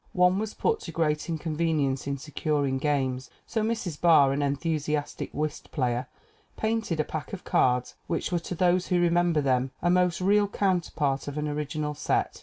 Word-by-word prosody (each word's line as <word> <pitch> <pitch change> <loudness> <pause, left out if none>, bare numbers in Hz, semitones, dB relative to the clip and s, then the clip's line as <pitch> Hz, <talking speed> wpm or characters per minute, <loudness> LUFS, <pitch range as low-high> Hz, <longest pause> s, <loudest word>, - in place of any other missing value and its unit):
One 180 +1 +4
was 215 0 -4
put 450 0 +1
to 440 - -7
great 150 -1 0
inconvenience 155 -4 -1
in 140 0 -1
securing 145 -1 -1
games. 130 -3 -1 0.2
So 225 - -1
Mrs. 215 -8 -2
Barr, 155 -5 +6
an 140 - -1
enthusiastic 150 +1 -2
whist 155 0 -4
player, 125 -3 -1 0.5
painted 220 -7 -1
a - - +3
pack 155 0 -6
of 190 - -6
cards, 125 0 +2
which 165 - -2
were 175 - +1
to 175 +2 -6
those 180 +1 +2
who 180 -2 +2
remember 175 -2 +3
them 130 -1 +1
a 175 - +2
most 180 -1 +2
real 205 +2 +3
counterpart 170 -9 0
of 145 +1 -5
an 150 0 -1
original 150 0 -2
set. 150 - -1
155 Hz, 175 wpm, -27 LUFS, 140-180 Hz, 0.5 s, Barr